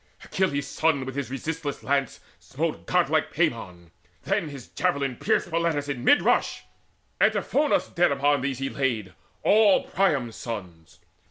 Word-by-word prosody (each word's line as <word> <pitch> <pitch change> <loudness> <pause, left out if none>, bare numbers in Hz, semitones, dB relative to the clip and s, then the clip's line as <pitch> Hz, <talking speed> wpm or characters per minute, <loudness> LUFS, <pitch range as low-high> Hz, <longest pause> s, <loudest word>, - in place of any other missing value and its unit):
Achilles' 145 -7 -1
son 155 -4 0
with 130 0 -6
his 140 -4 -3
resistless 145 +3 -4
lance 140 -1 0 0.2
Smote - - -4
godlike - - +1
Pammon; 85 -2 -2 0.3
then 155 - -1
his 135 -4 -10
javelin 140 -8 -1
pierced - - 0
Polites 165 -3 0
in 130 -4 -4
mid 290 - +5
rush: - - +1 0.6
Antiphonus 295 +1 +2
Dead 175 -1 +2
upon 140 0 +2
these 135 -1 -2
he 135 +1 -2
laid, 115 -9 -2 0.3
all 210 -1 +5
Priam's 140 - 0
sons. 90 -8 -8
140 Hz, 140 wpm, -25 LUFS, 125-160 Hz, 0.6 s, mid